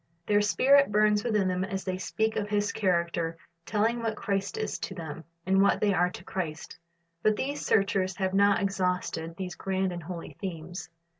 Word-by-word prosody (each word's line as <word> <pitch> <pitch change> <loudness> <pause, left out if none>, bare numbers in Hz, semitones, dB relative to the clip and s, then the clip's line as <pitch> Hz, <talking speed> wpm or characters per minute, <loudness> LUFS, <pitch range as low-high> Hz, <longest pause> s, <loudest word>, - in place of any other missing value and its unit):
Their 205 0 +3
spirit 275 +5 +4
burns 210 0 +3
within 210 -5 +1
them 185 0 0
as 195 -1 -3
they 185 -1 -3
speak 220 +5 -1
of 205 0 -2
His 205 -1 +1
character, 170 -3 0 0.3
telling 225 +3 +1
what 225 -1 -1
Christ 195 -1 -2
is 215 - -2
to 190 - -5
them, 160 -2 -6 0.2
and 190 +1 +4
what 200 - +4
they 205 -1 +3
are 180 -1 +3
to - - -10
Christ. 160 -5 -5 0.4
But 215 +3 +3
these 285 +6 -3
searchers 195 -2 +2
have 190 -1 -1
not 200 +1 +4
exhausted 180 -4 -1
these 185 -2 -4
grand 190 0 -1
and 175 -1 -5
holy 170 +1 -7
themes. 175 -2 -6
195 Hz, 180 wpm, -28 LUFS, 180-210 Hz, 0.4 s, spirit